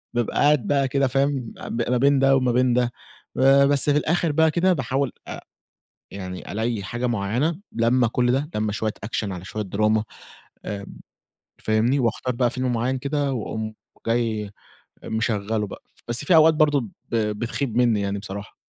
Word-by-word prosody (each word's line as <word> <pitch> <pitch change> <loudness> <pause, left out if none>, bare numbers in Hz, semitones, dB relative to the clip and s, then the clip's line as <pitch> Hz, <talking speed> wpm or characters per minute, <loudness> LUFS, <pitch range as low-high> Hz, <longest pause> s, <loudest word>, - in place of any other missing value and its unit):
فبابقي 120 -2 -1
قاعد 145 -6 +3
بقى 140 -2 +2
كده 135 0 +1
فاهم 135 -2 -1 0.4
ما 125 - +2
بين 140 +1 +4
ده 135 0 +4
وما 130 -2 +2
بين 125 0 +2
ده، 120 -1 +1 0.8
بس 145 0 +3
في 145 - +4
الآخر 165 +1 +1
بقى 160 +1 +3
كده 180 +2 +3
باحاول 135 -2 -1 0.2
أ - - -6 0.7
يعني 90 -2 -7
ألاقي 110 -1 -2
حاجة 120 +5 -3
مُعيّنة 120 - -1
لمّة 120 +1 +2
كُل 120 +2 +1
ده 140 +4 0
لمّة 105 0 0
شوية 110 0 -2
action 105 -2 -3
على 90 0 -7
شوية 105 0 -4
drama 110 +1 +3 0.6
امم، 100 -1 -6 0.7
فاهمني 110 +6 +2
وأختار 125 0 -1
بقى 120 -1 +1
فيلم 130 0 -1
مُعيّن 125 +3 -1
كده 140 0 -1
وأقوم 110 -2 -4 0.3
جاي 115 -3 0 0.6
مشغّله 110 -1 -1
بقى - - -10 0.2
بس 120 +5 -1
في 170 - +4
أوقات 160 0 +7
برضه 150 -3 +3
ب 110 - -7 0.3
بتخيب 115 +3 -2
مني 115 -4 +3
يعني 100 0 -2
بصراحة. 100 0 -8
120 Hz, 165 wpm, -23 LUFS, 110-140 Hz, 0.8 s, أوقات